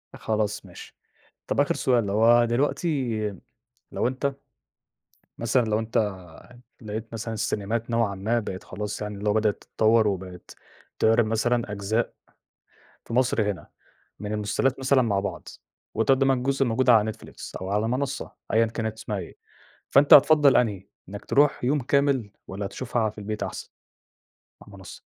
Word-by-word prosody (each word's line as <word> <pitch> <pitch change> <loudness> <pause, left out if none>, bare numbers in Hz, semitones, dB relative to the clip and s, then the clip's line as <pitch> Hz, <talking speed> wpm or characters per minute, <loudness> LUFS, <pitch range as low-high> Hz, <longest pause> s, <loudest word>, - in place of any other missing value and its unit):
خلاص 105 -1 -2
ماشي. - - -12 0.5
طب - - 0
آخر - - +2
سؤال 120 -3 +2
لو 100 - -2
هُو 120 +1 +6
دلوقتي 130 0 0 0.7
لو - - 0
أنت 130 +2 -2 1.0
مثلًا، 120 +2 +2
لو 110 -1 0
أنت 115 0 -3 0.8
لقيت 110 +1 -6
مثلًا 115 0 -4
السينيمات 110 +2 -2
نوعًا 115 -4 +1
ما 110 +5 0
بقِت 95 -4 -6
خلاص 105 +3 -6
يعني 105 -1 -5
اللي 105 +1 -1
هُو - - +2
بدأت 110 -1 0
تتطور، 110 0 +2
وبَقِت 95 -2 -5 0.4
تعرض 115 +1 +4
مثلًا 115 +1 0
أجزاء 105 +3 -1 0.9
في - - -8
مصر 120 -4 +2
هنا، 90 -6 -11 0.5
من 105 0 -4
المسلسلات 105 +6 0
مثلًا 130 0 +3
مع 105 -5 +1
بعض، 100 - -5 0.5
وتقدم 135 +4 +3
الجزء 135 +1 +1
الموجود 125 +1 +1
على 110 -2 +5
Netflix، 110 - -11
أو 95 - -4
على 105 +2 0
مَنصة 135 +3 -3 0.2
أيًا 115 +1 +4
كانت 110 -1 -4
اسمها 105 -2 -4
إيه، 90 - -8 0.5
فأنت 140 +1 +6
هتفَضّل 145 -1 +7
أنهي؟ 105 -6 0 0.2
إنَّك 100 +1 -8
تروح 145 -1 +2
يوم 140 +4 +2
كامل، 140 -4 +1 0.2
والّا 100 +2 -5
هتشوفها 115 +2 -2
في 110 - -15
البيت 105 +1 -4
أحسن - - -6 0.9
على 105 - -16
المَنصة؟ 95 -2 -11
115 Hz, 150 wpm, -25 LUFS, 105-125 Hz, 1.0 s, هتفَضّل